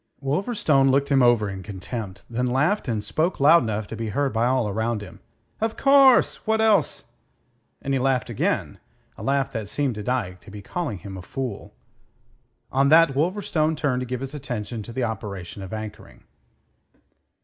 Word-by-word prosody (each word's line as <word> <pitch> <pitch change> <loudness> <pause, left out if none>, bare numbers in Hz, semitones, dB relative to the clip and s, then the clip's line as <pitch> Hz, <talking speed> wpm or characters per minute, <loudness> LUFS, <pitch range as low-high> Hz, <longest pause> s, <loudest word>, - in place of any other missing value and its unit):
Wolverstone 145 - +1
looked 140 +1 +2
him 135 -2 +4
over 120 -4 +4
in 95 -1 -6
contempt, 100 +2 -7
then 125 +2 -1
laughed 150 +10 +1
and 110 -4 -1
spoke 165 - -1
loud 155 +5 +7
enough 110 -2 -2
to 110 - -7
be 115 -1 -4
heard 140 +2 -1
by 115 +2 +2
all 130 -3 +1
around 110 +1 -2
him. 90 -5 -12 0.4
"Of 225 0 -2
course. 275 -4 +5
What 220 0 +2
else?" 215 -7 +2 0.8
And 135 - -1
he 135 - +2
laughed 130 -1 +1
again, - - -2 0.4
a - - -11
laugh 135 0 0
that 110 -5 -5
seemed 140 -1 0
to 105 - -6
Dyke 100 -6 -2
to - - -14
be 100 0 -9
calling 150 - -3
him 95 0 -9
a - - -7
fool. 125 +1 -6 1.0
On 135 +1 +3
that 160 -2 +6
Wolverstone 160 0 0
turned 140 -4 0
to 125 - -4
give 125 0 -4
his 135 +1 -5
attention 120 -6 -5
to 110 - -9
the 125 +2 -2
operation 100 -4 -5
of 95 - -8
anchoring. 105 - -8
125 Hz, 180 wpm, -24 LUFS, 105-145 Hz, 1.0 s, loud